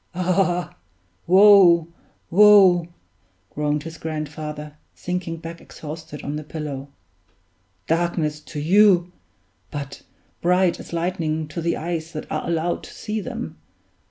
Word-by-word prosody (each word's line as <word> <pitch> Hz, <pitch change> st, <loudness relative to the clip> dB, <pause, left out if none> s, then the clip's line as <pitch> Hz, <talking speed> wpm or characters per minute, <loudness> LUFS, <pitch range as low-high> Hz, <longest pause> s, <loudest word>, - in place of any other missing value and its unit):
"Ah! 180 Hz, -1 st, 0 dB, 0.5 s
woe! 185 Hz, -3 st, +7 dB, 0.4 s
woe!" 190 Hz, -3 st, +6 dB, 0.7 s
groaned 150 Hz, 0 st, -1 dB
his 165 Hz, 0 st, -9 dB
grandfather, 150 Hz, -1 st, -6 dB, 0.2 s
sinking 180 Hz, -2 st, -4 dB
back 165 Hz, +1 st, -9 dB
exhausted 155 Hz, -1 st, -9 dB
on 145 Hz, +1 st, -3 dB
the 155 Hz, -, -6 dB
pillow. 145 Hz, -3 st, -6 dB, 1.0 s
"Darkness 165 Hz, -2 st, 0 dB
to 150 Hz, 0 st, -8 dB
you; 180 Hz, +2 st, +4 dB, 0.6 s
but 140 Hz, +2 st, -7 dB, 0.4 s
bright 180 Hz, 0 st, +2 dB
as -, -, -11 dB
lightning 165 Hz, -2 st, -2 dB
to 170 Hz, -, -5 dB
the 170 Hz, +1 st, -1 dB
eyes 165 Hz, 0 st, -4 dB
that 155 Hz, -, -5 dB
are -, -, -3 dB
allowed 170 Hz, +1 st, -1 dB
to -, -, -12 dB
see 215 Hz, 0 st, -4 dB
them. 240 Hz, +1 st, -6 dB
170 Hz, 120 wpm, -22 LUFS, 155-180 Hz, 1.0 s, woe